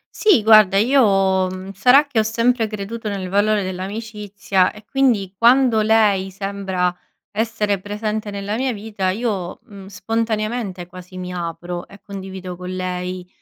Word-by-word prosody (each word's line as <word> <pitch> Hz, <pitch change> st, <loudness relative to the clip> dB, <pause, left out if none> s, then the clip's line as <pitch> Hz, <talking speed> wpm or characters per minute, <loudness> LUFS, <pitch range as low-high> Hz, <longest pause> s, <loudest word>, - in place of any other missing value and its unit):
Sì, 395 Hz, -, +4 dB
guarda 215 Hz, -3 st, +6 dB
io, 195 Hz, -6 st, +3 dB
mhmm, 185 Hz, +1 st, -7 dB
sarà 250 Hz, +9 st, +5 dB
che 280 Hz, -6 st, -1 dB
ho -, -, +5 dB
sempre 230 Hz, +1 st, +1 dB
creduto 215 Hz, +1 st, -5 dB
nel 195 Hz, -2 st, -4 dB
valore 205 Hz, +1 st, +2 dB
dell'amicizia 200 Hz, 0 st, -2 dB
e 210 Hz, 0 st, -15 dB
quindi 230 Hz, -7 st, +1 dB
quando 235 Hz, 0 st, +4 dB
lei 210 Hz, -3 st, +3 dB
sembra 190 Hz, -2 st, -2 dB, 0.4 s
essere 215 Hz, -2 st, -1 dB
presente 210 Hz, +1 st, -3 dB
nella 200 Hz, +1 st, -4 dB
mia 255 Hz, +2 st, -1 dB
vita 205 Hz, -3 st, -3 dB
io, 195 Hz, -3 st, -3 dB
mhmm, 200 Hz, -5 st, -12 dB
spontaneamente 215 Hz, -2 st, -2 dB
quasi 180 Hz, +1 st, -12 dB
mi 180 Hz, 0 st, -6 dB
apro 175 Hz, 0 st, -5 dB
e 200 Hz, -, -15 dB
condivido 190 Hz, -2 st, -8 dB
con 180 Hz, +1 st, -8 dB
lei, 180 Hz, 0 st, -4 dB
200 Hz, 145 wpm, -20 LUFS, 185-220 Hz, 0.4 s, guarda